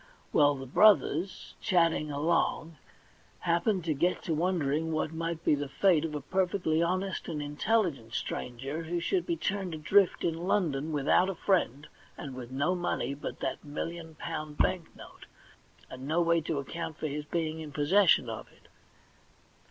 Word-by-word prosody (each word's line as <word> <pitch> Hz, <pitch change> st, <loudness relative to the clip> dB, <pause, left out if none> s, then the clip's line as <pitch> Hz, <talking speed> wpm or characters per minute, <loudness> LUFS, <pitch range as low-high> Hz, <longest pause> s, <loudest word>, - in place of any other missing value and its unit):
Well, 145 Hz, -1 st, +5 dB
the 135 Hz, -1 st, -7 dB
brothers, 190 Hz, +2 st, +3 dB
chatting 165 Hz, -4 st, +2 dB
along, 160 Hz, +1 st, 0 dB, 0.6 s
happened 175 Hz, +2 st, +1 dB
to 160 Hz, -, +1 dB
get 175 Hz, +6 st, 0 dB
to 170 Hz, -, -3 dB
w^ondering 160 Hz, -3 st, 0 dB
what 155 Hz, 0 st, -1 dB
might 165 Hz, 0 st, -4 dB
be -, -, +4 dB
the 145 Hz, -1 st, -1 dB
fate 170 Hz, 0 st, +3 dB
of 155 Hz, -2 st, -3 dB
a 145 Hz, -, -3 dB
perfectly 180 Hz, -1 st, 0 dB
honest 185 Hz, +3 st, -1 dB
and 160 Hz, -3 st, -3 dB
intelligent 145 Hz, -, 0 dB
stranger 135 Hz, +6 st, -4 dB
who 170 Hz, +2 st, -2 dB
should 360 Hz, -, 0 dB
be 340 Hz, -1 st, 0 dB
turned 190 Hz, -, -2 dB
adrift 185 Hz, +5 st, +3 dB
in 170 Hz, +1 st, -1 dB
London 160 Hz, -7 st, 0 dB
without 155 Hz, +5 st, +3 dB
a 195 Hz, -, -3 dB
friend, 155 Hz, -, 0 dB, 0.3 s
and 140 Hz, -, -7 dB
with 125 Hz, -2 st, -8 dB
no 140 Hz, +7 st, 0 dB
money 175 Hz, -7 st, -1 dB
but 140 Hz, -, -7 dB
that 135 Hz, -, -3 dB
million 160 Hz, +2 st, -6 dB
pound 155 Hz, -1 st, -5 dB
bank 180 Hz, -3 st, +1 dB
note, -, -, -13 dB, 0.6 s
and 130 Hz, +1 st, -8 dB
no 160 Hz, +3 st, +1 dB
way 170 Hz, -1 st, +3 dB
to 155 Hz, -1 st, -2 dB
account 160 Hz, +3 st, -5 dB
for -, -, -5 dB
his 150 Hz, 0 st, -3 dB
being 160 Hz, 0 st, -2 dB
in 155 Hz, -2 st, -7 dB
possession 155 Hz, 0 st, +4 dB
of 110 Hz, -1 st, -6 dB
it. -, -, -24 dB
160 Hz, 165 wpm, -30 LUFS, 145-175 Hz, 0.6 s, Well